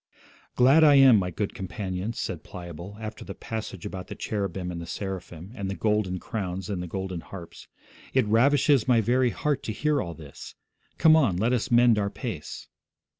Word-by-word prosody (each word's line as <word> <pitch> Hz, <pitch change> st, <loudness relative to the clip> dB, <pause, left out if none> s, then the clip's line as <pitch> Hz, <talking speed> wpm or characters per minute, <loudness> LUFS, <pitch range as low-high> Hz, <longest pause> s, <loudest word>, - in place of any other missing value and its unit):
'Glad 135 Hz, +6 st, +6 dB
I 145 Hz, -2 st, +7 dB
am, 135 Hz, -4 st, +8 dB
my 90 Hz, -1 st, -2 dB
good 100 Hz, +3 st, -3 dB
companion,' 95 Hz, +2 st, -4 dB
said -, -, -4 dB
Pliable, 85 Hz, +3 st, -9 dB
after 110 Hz, 0 st, -7 dB
the 95 Hz, -, -8 dB
passage 110 Hz, -5 st, -6 dB
about 95 Hz, -1 st, -6 dB
the -, -, -7 dB
cherubim 95 Hz, -3 st, -3 dB
and 85 Hz, -1 st, -5 dB
the 85 Hz, -, -8 dB
seraphim, 95 Hz, -2 st, -6 dB
and 100 Hz, -5 st, -4 dB
the 95 Hz, -, -3 dB
golden 105 Hz, -4 st, 0 dB
crowns 95 Hz, -1 st, -4 dB
and 95 Hz, -3 st, -2 dB
the 90 Hz, -, -5 dB
golden 95 Hz, -1 st, -4 dB
harps, 85 Hz, -2 st, -11 dB, 0.4 s
'it 130 Hz, -3 st, +2 dB
ravishes 130 Hz, +3 st, +3 dB
my 125 Hz, -2 st, +5 dB
very 125 Hz, +3 st, +2 dB
heart 145 Hz, +6 st, -1 dB
to -, -, -4 dB
hear 150 Hz, +5 st, 0 dB
all 85 Hz, -1 st, -6 dB
this. 75 Hz, -3 st, -11 dB, 0.4 s
Come 160 Hz, -1 st, +6 dB
on, 125 Hz, -, +3 dB
let 115 Hz, +6 st, +1 dB
us 125 Hz, 0 st, 0 dB
mend 120 Hz, -2 st, +5 dB
our 100 Hz, -1 st, 0 dB
pace.' 100 Hz, -, -6 dB
105 Hz, 185 wpm, -26 LUFS, 90-120 Hz, 0.4 s, am